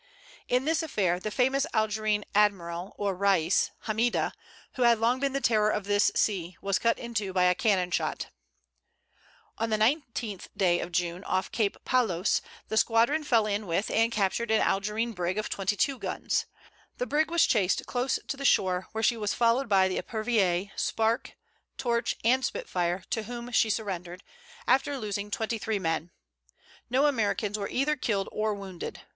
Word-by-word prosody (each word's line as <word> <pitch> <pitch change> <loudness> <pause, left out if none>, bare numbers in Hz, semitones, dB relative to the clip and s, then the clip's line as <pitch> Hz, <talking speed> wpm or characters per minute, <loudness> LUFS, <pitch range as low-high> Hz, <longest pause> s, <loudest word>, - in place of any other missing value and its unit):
In 250 +2 +1
this 320 +1 +1
affair, 195 - 0
the 215 - -4
famous 265 +6 +1
Algerine 215 -1 +1
admiral 185 -3 +1
or 200 -1 -1
Rais, 185 -3 +2 0.2
Hammida, 225 +2 +1 0.4
who 255 - -5
had 235 -1 +5
long 235 +3 +1
been 275 0 0
the 275 - 0
terror 215 -5 +3
of 210 - -1
this 205 +1 +2
sea, 180 -5 0
was 195 -1 0
cut 230 0 +2
in 235 0 -7
two 205 -4 -2
by 180 -1 +3
a 180 0 +5
cannon 190 -5 +1
shot. - - -2 1.3
On 225 +1 0
the 215 - +1
19th 230 - -1 0.3
of 180 - -6
June, 175 +1 -1
off 185 0 -1
Cape 210 -4 0
Palos, 220 -8 +1 0.3
the 220 - -2
squadron 235 +8 +3
fell 230 -7 +3
in 205 0 -2
with 175 +5 -1
and 225 +1 +2
captured 215 +2 0
an 220 0 +3
Algerine 210 +4 0
brig 180 0 -2
of 215 - -2
twenty 195 +1 -1
two 270 +4 0
guns. - - -2 0.5
The - - -1
brig 310 -3 +1
was 340 0 +4
chased 195 -5 +1
close 250 +1 0
to - - -2
the 275 - -7
shore, 185 -8 +2
where 220 0 -2
she 235 - +3
was 210 -2 -1
followed 235 +2 +2
by 190 -2 +5
the 185 - -1
Epervier, 205 -5 0
Spark, 225 +1 -1 0.4
Torch 235 -2 0
and 255 +3 +3
Spitfire, 180 -4 -2
to 225 - 0
whom 240 +1 -7
she 225 -1 +3
surrendered, 185 -4 -4 0.4
after 275 +2 +2
losing 205 -3 -4
twenty 220 +2 -2
three 220 -1 -1
men. 165 -2 -2 0.8
No 260 +4 +3
Americans 215 -5 0
were 200 - -3
either 285 +4 +1
killed 205 -7 -1
or 215 0 -1
wounded. 190 -3 -7
215 Hz, 175 wpm, -28 LUFS, 195-235 Hz, 1.3 s, had